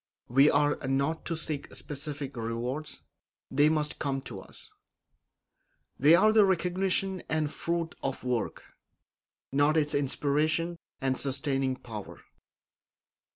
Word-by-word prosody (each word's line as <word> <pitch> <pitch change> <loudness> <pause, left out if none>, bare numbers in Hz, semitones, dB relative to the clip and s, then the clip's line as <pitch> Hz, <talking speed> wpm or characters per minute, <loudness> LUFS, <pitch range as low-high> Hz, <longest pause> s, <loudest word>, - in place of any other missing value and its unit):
We 135 +4 +6
are 145 0 +3
not 140 +4 0
to 165 - -2
seek 155 -3 -4
specific 145 -1 -5
rewards; 120 +6 -3 0.5
they 145 +3 +5
must 150 -1 0
come 140 -2 -1
to - - -8
us. - - -9 1.3
They 150 +5 +7
are 215 +4 +5
the 220 -1 +7
recognition 190 0 +1
and 155 -2 0
fruit 170 0 -2
of 135 -1 -3
work, 125 -3 -2 0.9
not 145 +3 +3
its 150 -1 +1
inspiration 150 +4 +1 0.2
and 130 -1 0
sustaining 135 -1 0
power. 110 -5 -8
145 Hz, 115 wpm, -29 LUFS, 135-160 Hz, 1.3 s, They